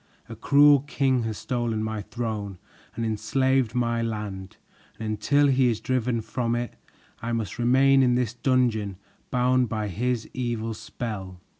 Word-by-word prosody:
A 115 - -8
cruel 145 +4 +6
king 135 -2 0
has 110 -2 -3
stolen 120 -3 -2
my 110 -1 -3
throne 105 -3 -4 0.4
and 115 0 -2
enslaved 120 +3 +1
my 115 -1 +1
land, 105 -4 -5 0.4
And 110 - -5
until 140 +8 +2
he 130 -2 +4
is 110 -2 -1
driven 125 -1 -1
from 120 +1 -2
it, 120 0 -3 0.5
I 115 0 -3
must 115 -2 -3
remain 135 +3 +5
in 125 -2 +3
this 125 -2 0
dungeon, 120 -6 +1 0.3
bound 125 -1 +2
by 110 -1 -2
his 120 +4 -1
evil 120 -3 -2
spell. 100 -5 -6
120 Hz, 150 wpm, -25 LUFS, 110-130 Hz, 0.5 s, cruel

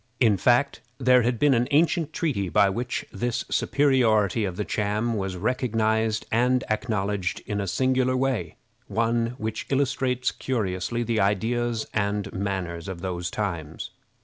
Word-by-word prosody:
In 110 -5 +4
fact, 125 +8 +2 0.2
there 125 -1 +5
had 120 +1 0
been 145 +3 +4
an 120 0 +2
ancient 160 +1 +2
treaty 135 - -1
by 100 +1 +4
which 120 +4 -3
this 120 -1 -2
superiority 115 -6 +2
of 90 -2 -4
the 105 - -2
Cham 105 +3 -1
was 95 -3 -2
recognized 110 -1 0
and 125 +2 +2
acknowledged 105 -4 -1
in 105 -1 -2
a 100 - -3
singular 130 +4 +1
way 130 -2 -1 0.3
one 115 +1 0
which 110 -2 -4
illustrates 130 -2 0
curiously 110 -2 -2
the 115 -2 0
ideas 115 +3 0
and 100 -1 -1
manners 95 -4 -3
of 95 -3 -6
those 90 -2 -3
times. 85 -8 -4
110 Hz, 145 wpm, -25 LUFS, 100-125 Hz, 0.3 s, there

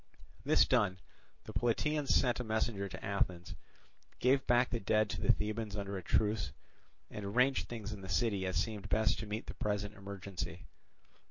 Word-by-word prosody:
This - - +5
done, 105 -7 +2 0.5
the - - -9
Plataeans 145 +5 +1
sent 125 -2 +3
a - - -1
messenger 110 -3 -1
to - - -7
Athens, 90 -3 -1 0.6
gave 130 +2 +3
back 120 +1 +4
the 120 - 0
dead 110 +1 +2
to - - -4
the - - +5
Thebans 105 0 -2
under 100 -1 -4
a 95 - -3
truce, 105 -4 +1 0.6
and 105 - -6
arranged 125 +7 +2
things 110 -2 -5
in 100 - -8
the 95 - -8
city 100 -6 +1
as 95 - -2
seemed 105 -3 -2
best 110 0 +2
to 110 - -5
meet 105 +2 -4
the - - -6
present 105 0 -2
emergency. 95 -4 -6
105 Hz, 175 wpm, -34 LUFS, 100-115 Hz, 0.6 s, This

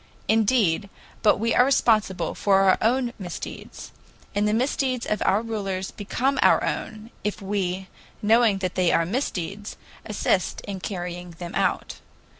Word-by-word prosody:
Indeed, 215 -4 +2 0.3
but 215 - +4
we 230 +3 0
are - - +6
responsible 215 -9 +2
for 195 -1 +3
our 190 -1 +4
own 240 +1 +1
misdeeds. 175 -3 -7 0.4
And 205 +1 +1
the - - +2
misdeeds 255 0 0
of 215 - -1
our 200 +4 +3
rulers 195 -4 -3
become 260 +6 -1
our - - +5
own, 220 +1 -4
if 210 - -2
we, 190 -2 -2 0.3
knowing 220 -1 +4
that 180 - -2
they 180 -2 +2
are 165 - +3
misdeeds, 200 - -3 0.3
assist 200 -3 0
in 195 -2 -6
carrying, 180 -2 -5
them 175 -1 -7
out. - - -1
205 Hz, 145 wpm, -24 LUFS, 185-225 Hz, 0.4 s, are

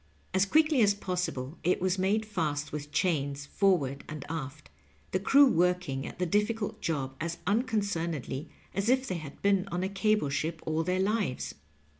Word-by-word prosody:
As 190 +1 +3
quickly 305 0 +4
as 205 -2 +5
possible 180 -8 -3
it 180 - +2
was 185 +1 0
made 205 +4 +2
fast 155 -8 -2
with 150 0 -6
chains 145 -7 0
forward 145 -7 +1
and 155 -2 -6
aft, 155 -2 -6 0.4
the 185 - +1
crew 280 +9 +6
working 180 - +1
at - - -9
the 180 - 0
difficult 210 +4 0
job 135 -5 -2
as 170 +1 -2
unconcernedly 180 - -1 0.2
as 200 +4 0
if 260 +1 +3
they 185 - -2
had 150 -2 -9
been 200 -1 +3
on 180 0 -2
a 190 - -1
cable 210 -4 +1
ship 160 +3 -2
all 160 0 0
their 180 +3 0
lives. 200 - 0
180 Hz, 170 wpm, -30 LUFS, 150-205 Hz, 0.4 s, crew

